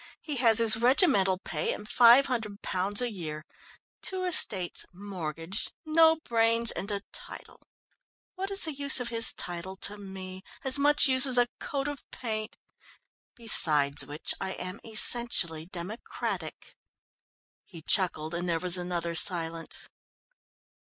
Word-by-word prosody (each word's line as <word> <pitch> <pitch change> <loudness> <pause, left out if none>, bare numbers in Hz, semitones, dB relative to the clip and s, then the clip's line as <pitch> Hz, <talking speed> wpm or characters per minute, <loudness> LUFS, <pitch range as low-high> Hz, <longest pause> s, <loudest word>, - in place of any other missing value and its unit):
"He 295 -3 -5
has 230 -3 +3
his 225 -2 +8
regimental 235 - +3
pay - - -4
and 210 - -11
£500 225 -5 +2
a 245 -1 -1
year, 155 -6 -7 0.6
two 375 -1 -4
estates, 195 - +1
mortgaged, 180 -2 -5
no 320 +1 +4
brains 230 -5 +2
and 200 - -5
a 200 -1 -3
title - - -11 0.7
what 385 +1 -5
is 395 0 -3
the 315 - -4
use 280 -1 +5
of 245 -1 -4
his 230 -1 +3
title 175 +2 -6
to 205 +2 -6
me? 190 -1 -9 0.2
As 265 +1 +4
much 295 +1 +4
use 260 0 +5
as 255 -1 +2
a 245 0 +3
coat 275 0 -4
of 290 -1 -7
paint! 215 -3 -6 0.8
Beside 150 - +2
which, 150 +2 -5
I 190 -1 -3
am 185 +4 -7
essentially 215 -8 0
democratic." 185 +5 -7 0.9
He 165 -5 -14
chuckled, 160 -4 0
and 175 +1 -3
there 165 -1 -1
was 180 0 +2
another 175 -1 -4
silence. 165 -1 +2
205 Hz, 135 wpm, -27 LUFS, 175-250 Hz, 0.9 s, his